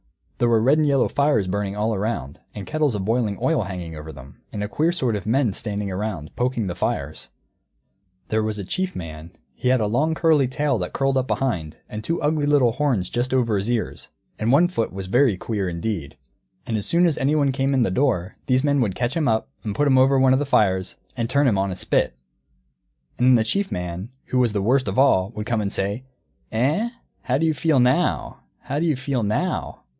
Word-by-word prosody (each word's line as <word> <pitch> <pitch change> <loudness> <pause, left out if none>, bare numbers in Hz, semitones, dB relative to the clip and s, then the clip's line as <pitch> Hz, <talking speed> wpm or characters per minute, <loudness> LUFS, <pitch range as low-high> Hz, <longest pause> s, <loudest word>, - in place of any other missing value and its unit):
There 120 - +3
were 115 -1 +4
red 135 +7 +4
and 155 - +3
yellow 140 -3 +3
fires 140 -8 +2
burning 100 +1 -2
all 110 +2 0
around, 95 - -3 0.2
and 100 - -6
kettles 150 -6 0
of 95 -2 -3
boiling 110 -2 0
oil 165 -5 +1
hanging 90 -3 -6
over 75 +1 -8
them, 70 -2 -14
and 105 - -4
a - - -2
queer 155 +9 +1
sort 130 -10 0
of 100 -1 -5
men 120 -2 +2
standing 100 -1 -3
round, 95 -5 -4
poking 125 -3 -1
the 90 - -3
fires. 90 - -3 1.0
There 110 0 +1
was 110 -1 -2
a 100 - -5
Chief 185 - -2
Man; 80 -1 -7 0.2
he - - -4
had 130 0 +4
a 110 - +1
long 145 +10 +1
curly 155 -5 +3
tail 140 -2 0
that 90 - -4
curled 135 0 +1
up 130 0 0
behind, 90 -13 -2
and 105 0 -7
two 165 +6 -1
ugly 150 0 0
little 140 -5 +4
horns 120 -9 0
just 125 +2 -1
over 115 -4 +2
his 100 +3 -1
ears; 120 -3 -2 0.3
and 110 +2 +1
one 160 +6 +5
foot 145 -11 -2
was 95 0 -6
very 105 +2 +3
queer 100 -2 -2
indeed. 85 - -4 0.5
And 115 - -2
as 105 - -2
soon 175 +1 +3
as 165 -4 +1
anyone 140 0 +2
came 135 +1 0
in 130 - +3
the 95 - 0
door, 110 -5 0
these 130 0 +2
men 145 -2 +2
would 100 -6 0
catch 120 +1 -1
him 160 -4 +1
up 110 -1 +1 0.2
and 105 -2 -4
put 145 - +2
him 130 -2 +5
over 135 +1 +4
one 130 0 +5
of 130 - +3
the 145 - -1
fires, 95 -7 +2 0.2
and 115 -2 -2
turn 140 +2 +3
him 100 -6 +2
on 100 0 0
a 90 - -4
spit. 80 - 0 1.0
And 125 - +3
then 130 - +7
the 115 - +3
Chief 195 - -1
Man, 90 +4 -4 0.2
who 130 - 0
was 120 -4 +2
the 100 -2 -1
worst 130 +4 +2
of - - -2
all, 100 -9 +4
would 105 - -4
come 115 -2 0
and 100 -1 -2
say, 100 +7 -2 0.5
"Eh, 150 - +1 0.3
how 130 +1 0
do 160 - +1
you 160 - +2
feel 150 0 +2
now? 125 +1 +1 0.2
How 140 +2 -3
do 170 - +1
you 155 - +2
feel 130 -1 -2
now?" 105 0 -2
120 Hz, 230 wpm, -23 LUFS, 100-140 Hz, 1.0 s, then